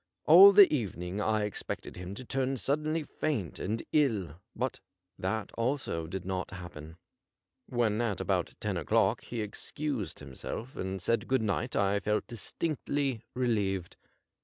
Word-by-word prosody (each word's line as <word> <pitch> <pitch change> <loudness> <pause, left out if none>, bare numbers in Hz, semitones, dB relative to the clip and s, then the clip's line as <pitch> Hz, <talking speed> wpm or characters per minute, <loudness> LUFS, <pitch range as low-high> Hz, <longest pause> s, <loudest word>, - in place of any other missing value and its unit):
All 185 +6 +10
the 200 0 +10
even 105 - -2
ing 90 +4 -3
I 110 0 +1
expected 105 - -4
him 90 +2 -6
to 130 - -7
turn 135 +1 0
suddenly 150 +5 0
faint 135 - -2
and 110 +4 -2
ill, 100 - +1
but 130 0 -2 0.4
that 100 +3 -2
also 115 - -2
did 90 +2 -5
not 95 0 -2
happen. 85 -3 -9 0.7
When 115 -2 +1
at 105 -6 -1
about - - -1
ten - - -2
o'clock - - +2
he 120 -2 -4
excused 110 - -3
himself 75 - -7
and 95 +1 -3
said 115 +6 0
good 130 -3 +2
night 110 +4 -1
I 100 0 +2
felt 105 +1 0
distinctly 140 +1 -2
relieved. 100 -8 0
110 Hz, 145 wpm, -30 LUFS, 95-130 Hz, 0.7 s, All